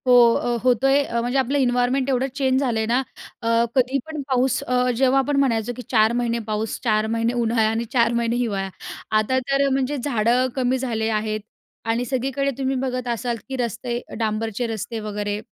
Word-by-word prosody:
हो, 250 - +6 0.2
अ, 240 0 0
होतोय. 270 +3 +3 0.2
म्हणजे 245 +3 -1
आपलं 265 +2 +1
इन्वायरनमेंट 250 +1 +1
एवढं 260 0 +1
चेंज 265 -2 +2
झालंय 235 -5 0
ना, 240 +4 +2 0.4
अ, 230 - -3 0.3
कधी 260 +1 +2
पण 315 -2 -5
पाऊस 260 0 +2
अ, 250 0 +1
जेव्हा 265 +1 +4
आपण 275 +1 0
म्हणायचो, 245 -3 +1
की - - -5
4 220 -1 +4
महिने 235 -1 0
पाऊस, 215 0 -2
4 215 -2 +2
महिने 230 +1 0
उन्हाळा 230 -2 +2
आणि 225 +1 -1
4 235 -2 +3
महिने 235 0 0
हिवाळा. 205 -6 -1 0.5
आता 240 +5 +2
तर 275 0 +3
म्हणजे 270 +2 0
झाडं 245 -1 +1
कमी 260 -1 +1
झाले 225 -4 -1
आहेत 215 0 -1 0.5
आणि 230 +2 0
सगळीकडे 270 +2 -1
तुम्ही 270 0 -1
बघत 255 -1 -2
असाल, 235 0 -2
की 265 - -3
रस्ते 240 0 -3 0.2
डांबरचे 220 +1 -1
रस्ते 225 +1 -4
वगैरे 205 -1 -3
245 Hz, 180 wpm, -22 LUFS, 225-260 Hz, 0.5 s, हो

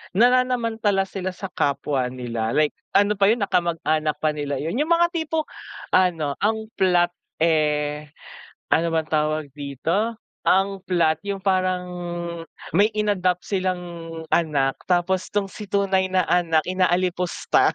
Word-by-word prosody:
nananamantala 230 -4 +3
sila 185 -1 -4
sa 195 0 -6
kapwa 140 -2 0
nila 120 -3 -3
like, 150 0 +3 0.2
ano 205 0 +3
pa 200 - +4
yun 235 - -4
na 200 - 0
kamag-anak 155 -3 +1
pa 155 - +2
nila 145 -2 -3
yun, 165 - -2
yung 315 +4 +2
mga 345 0 +4
tipong, 320 -2 -1 0.5
ano 165 -6 +2
ang 220 +1 -1
plot 175 -2 +3 0.3
eh, 150 -2 +1 0.6
ano 165 - +3
bang 160 -1 0
tawag 155 -1 0
dito? 160 - -1 0.3
Ang 195 0 +2
plot 170 -4 +2
yung 200 -1 -3
parang, 185 -2 +1 0.9
may 210 +2 +4
in-adopt 190 -4 0
silang 185 -2 0 0.5
anak 145 -5 +1
tapos 185 +1 +1
'tong 205 -1 0
si 210 +2 -8
tunay 195 -1 +1
na 185 0 +2
anak 165 -3 +3
inaalipusta. 180 -1 +1
180 Hz, 135 wpm, -23 LUFS, 155-200 Hz, 0.9 s, pa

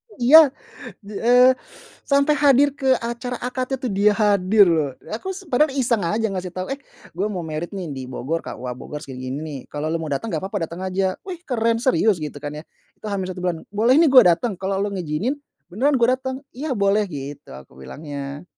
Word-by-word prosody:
Iya, 290 +5 +8 0.6
eee, 245 +5 +4 0.6
sampai 280 +2 +4
hadir 280 0 +5
ke 265 -1 +2
acara 240 +1 -4
akad 255 +1 -3
itu 255 - -3
dia 205 0 +3
hadir, 205 -1 +4
loh. 155 -4 +1 0.2
Aku 375 +13 -5
s 380 -1 -10
padahal 300 +3 +3
iseng 240 -6 +1
aja 215 +6 0
ngasih 185 -2 -5
tau, 185 +1 -4
"Eh, 270 - -2 0.4
gua 205 +3 -1
mau 185 - -3
married, 155 +2 -4
nih, 190 -3 -5
di 130 - -5
Bogor, 155 +6 -3
KUA 125 0 -6
Bogor, 150 +3 -8
segini-gini, 130 -1 -6
nih, 145 -3 -6
kalau 150 +1 -3
lu 165 - 0
mau 155 - -5
datang, 180 +12 -2
enggak - - -3
papa 195 -4 -2
datang 170 +2 -8
aja." 190 0 0
"Wih, 370 -3 -6
keren, 230 -2 +1
serius?" 220 -7 +2
Gitu, 150 -1 -5
kan, 145 - -4
ya, - - -15 0.3
itu 215 - -10
H-1 185 -2 -3
bulan, 175 -3 -2
"Boleh, 230 +5 +3
nih, 325 -1 +6
gue 255 -2 +9
datang? 210 +7 +1
Kalau 195 0 -1
lu 205 - -1
ngizinin, 180 - -2 0.4
beneran 265 +9 +2
gue 235 0 +3
datang." 260 0 -3 0.2
"Iya, 270 +1 -3
boleh." 200 +1 +2
Gitu 140 -2 -8
aku 65 -1 -13
bilangnya. 140 - -7
205 Hz, 195 wpm, -22 LUFS, 165-250 Hz, 0.6 s, gue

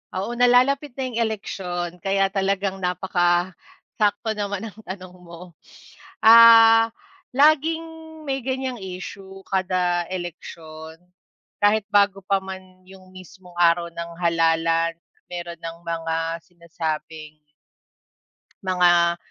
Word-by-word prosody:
Oo, 195 +5 -3
nalalapit 255 +3 +3
na 270 - -3
'yong 250 -3 -4
eleksiyon 180 -5 -4
kaya 195 +1 0
talagang 195 0 -1
napakasakto 180 +4 -1
naman 205 -1 -4
ng 210 - -19
tanong 185 -1 -8
mo, 180 0 -13 0.7
ah, 225 0 +8 0.5
laging, 310 +3 +3 0.4
may 270 -2 -2
ganyang 260 -1 -3
issue 190 +1 -9
kada 180 -2 0
eleksyon, 160 -3 -8 0.7
kahit 210 +1 +4
bago 200 -1 +3
pa 195 0 +1
man 190 -1 -11
yung 190 -1 -16
mismong 185 -1 -15
araw 170 0 +3
ng 170 0 -7
halalan 165 -1 +1 0.4
meron 175 -1 -7
ng 165 0 -7
mga 165 0 -3
sinasabing 160 -3 -6 1.3
mga 175 -2 +3
185 Hz, 105 wpm, -22 LUFS, 170-205 Hz, 1.3 s, ah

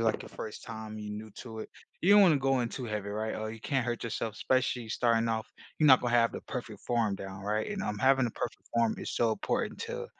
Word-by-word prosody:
like, 110 -1 +1
your - - -10
first 110 - -7
time, 110 -2 -7
you're 105 0 -5
new 110 +1 -7
to 110 -2 -7
it. - - -7 0.3
You 190 +4 +5
don't 205 - +9
wanna 170 -6 +6
go 135 -1 +2
in 120 - 0
too 125 - -5
heavy, 105 -3 -3
right, 110 +2 -2
or 110 0 -3
you 115 - -9
can 135 +2 0
hurt 120 -1 -2
yourself, 115 -1 -3
especially 125 -3 0
starting 115 0 +2
off. 110 -1 -1 0.3
You're 155 - +4
not 130 -2 +8
gonna 120 -1 -1
have 115 -1 +4
the - - -5
perfect - - -6
form 115 -4 +1
down, 95 0 -7
right? 105 - -1
And, 205 -2 -3
um, 105 0 -2
having 130 +1 +4
a - - -3
perfect - - -5
form 115 -1 +2
is - - -4
so 115 -2 +2
important - - -2
to, - - -4
115 Hz, 255 wpm, -30 LUFS, 110-125 Hz, 0.3 s, don't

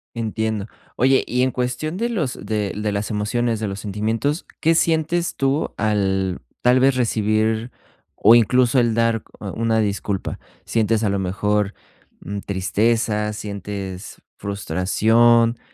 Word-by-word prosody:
Entiendo. 110 -2 -2 0.3
Oye, 130 +1 +3
y 125 +1 +1
en 130 - +1
cuestión 125 +6 -2
de 235 +3 -1
los 155 - -1
de 105 -2 -1
l 105 - -6
de 105 - -1
las 100 +2 -2
emociones, 110 +2 -1
de 110 - -2
los 100 0 -5
sentimientos, 110 - -2
¿qué 165 +1 +3
sientes 165 +1 +1
tú 135 +3 0
al 95 -3 0 0.2
tal 125 +1 +4
vez 135 0 +4
recibir 110 -1 0 0.4
o 110 - +6
incluso 120 +3 +4
el 115 -2 +2
dar 115 -1 +1 0.2
u - - -9
una 115 +2 0
disculpa? 100 -2 -2 0.3
¿Sientes, 115 0 +1
a 105 - +2
lo 100 0 0
mejor, 105 +2 0 0.5
mm, 100 +1 -5
tristeza, 105 +2 0
sientes 100 -2 -6 0.2
frustración? 110 +5 +2
110 Hz, 140 wpm, -21 LUFS, 100-120 Hz, 0.5 s, o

